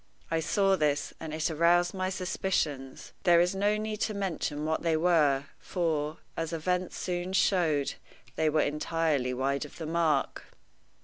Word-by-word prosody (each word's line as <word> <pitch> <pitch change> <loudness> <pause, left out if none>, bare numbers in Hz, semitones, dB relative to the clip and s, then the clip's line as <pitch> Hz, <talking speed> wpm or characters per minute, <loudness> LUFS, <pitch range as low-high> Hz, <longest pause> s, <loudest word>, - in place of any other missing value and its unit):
I 165 - +2
saw 195 +4 +2
this, 150 -4 0
and 160 - -6
it 160 +1 -1
aroused 175 +2 +3
my 185 -1 -1
suspicions. 175 -8 -2
There 175 -2 +5
is 175 +2 +3
no 205 +2 +1
need 215 0 -4
to 215 - 0
mention 165 -6 -2
what 160 0 0
they 165 -2 +1
were, 155 -5 +3 0.2
for, 160 -3 -1 0.2
as 165 0 -3
events 180 +2 -1
soon 180 0 -3
showed, 165 -8 +2 0.4
they 160 -1 +2
were 155 0 +2
entirely 150 -3 0
wide 135 +2 -1
of 150 - -11
the 165 - -5
mark. 160 -3 0
165 Hz, 160 wpm, -29 LUFS, 150-180 Hz, 0.4 s, There